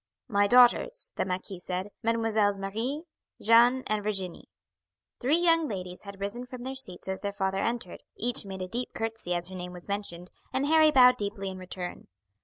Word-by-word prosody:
"My 205 0 +3
daughters," 250 - +5
the - - -1
marquis 185 0 -4
said, 185 +2 -4
"Mesdemoiselles 220 -3 +2
Marie, 225 +10 -3 0.4
Jeanne, 240 +4 +5
and 215 0 0
Virginie." 195 -4 -3 0.7
Three 275 +6 +3
young 330 -2 +4
ladies 185 -4 -6
had 200 -1 -9
risen 235 +5 -4
from 250 -1 -8
their 265 +1 -4
seats 190 -11 -5
as 190 0 -3
their 200 - -3
father 190 -1 -1
entered, 230 -4 -3 0.2
each 240 +1 -1
made 190 -2 -6
a - - -5
deep 240 +5 -4
curtsy 225 -5 -2
as 175 +1 -3
her 190 - -8
name 180 0 -6
was 175 -1 -11
mentioned, 190 -4 -5 0.2
and 265 +2 0
Harry 315 +1 +6
bowed 250 -3 +7
deeply 200 -2 -3
in 185 - -8
return. 180 -1 -6
205 Hz, 185 wpm, -28 LUFS, 190-245 Hz, 0.7 s, bowed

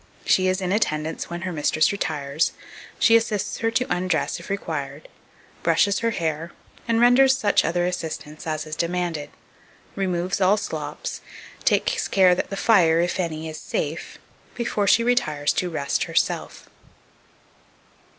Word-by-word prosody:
She 185 0 +3
is 185 +1 0
in 185 -1 -1
attendance 160 -6 -1
when 170 0 -5
her 185 0 -3
mistress 155 0 +2
retires; 155 -6 -1 0.4
she 230 - +5
assists 215 -3 0
her 225 - +1
to 240 +3 0
undress 180 -1 -1
if - - -11
required, 155 -7 -4 0.5
brushes 200 -1 +2
her 230 - +1
hair, 165 -4 -3 0.3
and 230 -1 +2
renders 260 +2 +5
such 210 -5 +2
other 175 +2 0
assistance 160 -3 -5
as 155 0 -2
is 155 0 -6
demanded; 170 -3 -2 0.7
removes 185 0 -1
all 190 +3 +4
slops; - - -5 0.4
takes 465 -3 +1
care 185 -2 +5
that 180 - -2
the 195 - -5
fire, 175 -7 +4
if 175 +2 0
any, 160 -3 -3
is 155 0 -7
safe, 160 +3 -4 0.4
before 215 -4 -1
she 230 - +5
retires 230 -13 +1
to 180 - -1
rest 140 -4 -1
herself. - - -2
180 Hz, 145 wpm, -23 LUFS, 160-205 Hz, 0.7 s, she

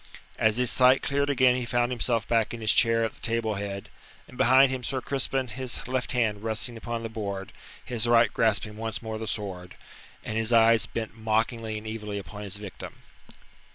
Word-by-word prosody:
As 110 0 +3
his 125 -1 +3
sight 130 0 +5
cleared 140 0 0
again 130 -2 +4
he 125 - -2
found 120 0 0
himself 120 -1 0
back 115 0 +1
in 115 - -9
his 110 - +3
chair 115 -1 +3
at 110 - -4
the - - -18
table 115 -1 -1
head, 100 -1 -5 0.4
and - - -14
beside 130 +2 +5
him 130 -1 -4
Sir 130 +2 -1
Crispin, 135 -1 -1
his 125 +3 -4
left 125 -1 -2
hand 110 -5 0
resting 115 +2 -1
upon 115 0 -5
the - - -2
board, 100 -3 -5 0.3
his 120 -1 -1
right 115 -2 +4
grasping 105 -1 0
once 115 +1 -4
more 110 -1 -4
the 110 - -5
sword, 95 -5 -5 0.5
and 110 - -4
his 110 +1 0
eyes 115 -1 +5
bent 110 -2 -5
mockingly 110 0 -1
and 105 - -8
evilly 105 -2 -5
upon 100 +1 -8
his 100 -1 -6
victim. 100 -2 -9
115 Hz, 195 wpm, -27 LUFS, 110-125 Hz, 0.5 s, sight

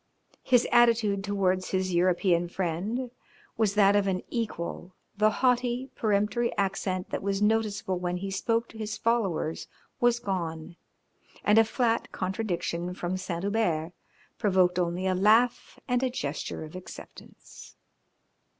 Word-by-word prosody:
His 245 -2 +3
attitude 230 -5 +4
towards 190 -2 0
his 185 -1 -1
European 175 0 +2
friend 195 +8 -2 0.4
was 215 -2 +1
that 200 -1 +5
of 205 -1 +2
an 185 -1 -1
equal, 185 -5 -4 0.2
the 215 +1 +4
haughty, 250 +2 0
peremptory 215 +2 +1
accent 190 -2 -1
that - - -2
was 195 0 -1
noticeable 210 -3 0
when 180 0 -2
he 195 +2 -5
spoke 230 +4 0
to 225 - -12
his 215 0 -4
followers 200 -9 -1 0.3
was 240 -1 +3
gone, 170 -7 -4 0.7
and 210 +2 +5
a - - +7
flat 230 +1 0
contradiction 180 -3 -3
from 180 0 -3
Saint 180 -2 -4
Hubert 185 -6 0 0.5
provoked 185 -3 +3
only 175 +1 -1
a 190 - +2
laugh 220 +6 +3
and 245 -1 +1
a 260 - +1
gesture 155 - -4
of 155 +2 -10
acceptance. 185 - -12
200 Hz, 135 wpm, -28 LUFS, 180-225 Hz, 0.7 s, a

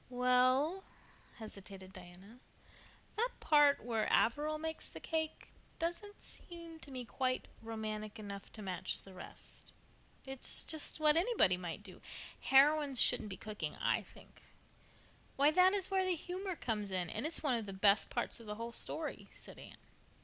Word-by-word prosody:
"Well," 255 +8 +3 0.5
hesitated 195 -3 -9
Diana, 185 +5 -13 0.8
"that 475 +3 +2
part 295 -2 +5
where 225 -2 0
Averil 300 +6 +3
makes 320 +1 -3
the - - -9
cake 315 -1 -3 0.3
doesn't 345 +5 -4
seem 335 -2 -10
to 300 - -11
me 255 -2 -5
quite 255 +1 -1
romantic 215 -1 -4
enough 200 -2 -7
to 215 - -6
match 185 -2 -3
the 195 - -13
rest. 185 - -10 0.5
It's 265 -1 0
just 315 0 -1
what 305 0 +5
anybody 350 - +4
might 180 +2 -5
do. 190 -3 -12 0.4
Heroines 280 -1 +5
shouldn't 210 - +4
do 190 - -6
cooking, 215 -1 -5
I - - +1
think." - - -17 0.9
"Why, 285 +2 +5
that 370 +4 +6
is 390 -1 -2
where 380 -1 +3
the 370 -1 +2
humor 365 +3 -4
comes 215 -8 -2
in, 180 -3 -2
and - - -2
it's 325 - -2
one 285 -4 +2
of 225 -3 -1
the - - -4
best 200 +2 +4
parts - - -2
of 230 - -12
the 210 - -4
whole 230 +2 -5
story," 310 +6 -4
said - - -12
Anne. - - -12
255 Hz, 160 wpm, -35 LUFS, 210-315 Hz, 0.9 s, that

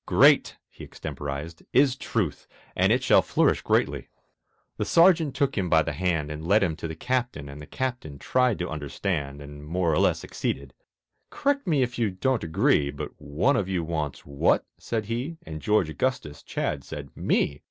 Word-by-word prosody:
Great," - - +5
he - - -13
extemporized, 75 +4 -6
"is 135 -1 +4
Truth, 105 - -2 0.3
And - - +3
it - - +2
shall - - +6
flourish - - +2
greatly." - - 0 0.7
The - - 0
Sergeant 165 -5 +4
took 140 -1 +1
him 95 -4 -1
by 80 -1 +5
the 80 - -3
hand 80 -2 -1
And 75 +1 -6
led 100 +2 +4
him 85 -4 0
to - - -5
the 80 - -6
Captain, 120 - -2
and 70 +1 -9
The 75 - -10
Captain 120 - -4
tried 125 - +1
to 90 - -3
understand, 75 -1 -3
And 75 0 -10
(more 85 +2 0
or - - +2
less) - - +3
succeeded; 70 -2 -4 0.6
"Correct 280 -5 0
me 150 -6 +3
if 125 0 -4
you 115 -3 +2
don't 115 +5 0
agree, 80 -3 +2
But - - -6
one 75 - +1
of 95 -2 -1
you 90 -3 0
wants 80 -3 -3
what?" 70 -1 +1
said 110 -2 -3
he, 125 +9 -3
And 80 -1 -7
George 105 -3 +2
Augustus 80 - -2
Chadd 70 -2 -3
said, 70 +1 -8
"Me!" 70 0 0
85 Hz, 185 wpm, -26 LUFS, 75-125 Hz, 0.7 s, shall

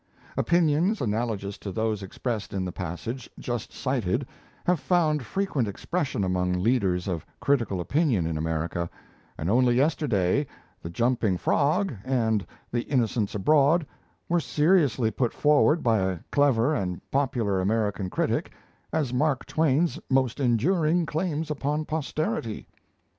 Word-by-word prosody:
Opinions 170 +4 +2
analogous 105 -3 -2
to 100 - -5
those 110 0 -1
expressed 105 +3 -4
in 95 -1 -1
the 90 - -3
passage 100 +9 -5
just 120 -3 -4
cited 130 -2 -1 0.4
have 180 -2 +2
found 155 -4 +2
frequent 150 - -1
expression 130 - -2
among 90 -1 0
leaders 95 -2 +1
of 85 -5 -2 0.2
critical 115 -9 +1
opinion 125 - +1
in 80 -1 -2
America; 80 +2 -2 0.5
and 80 - -3
only 120 +4 +3
yesterday 135 - +1 0.3
'The 85 - -6
Jumping 115 -1 +1
Frog' 155 - +1
and 115 -6 0 0.2
'The 120 - 0
Innocents 115 -6 0
Abroad' 150 - +4 0.4
were 175 0 +2
seriously 150 - +2
put 120 +2 -1
forward, 150 +2 +4
by 115 -3 +3
a 95 -2 -1
clever 140 -1 +3
and 90 - -2
popular 125 -9 +1
American 105 -1 0
critic, - - -1 0.4
as 145 -6 -1
Mark 140 +1 +1
Twain's 160 +1 +1
most 130 -1 +1
enduring 155 - +2
claims 160 -1 -2
upon 150 +1 -1
posterity! 150 -8 -3
125 Hz, 130 wpm, -26 LUFS, 100-150 Hz, 0.5 s, Abroad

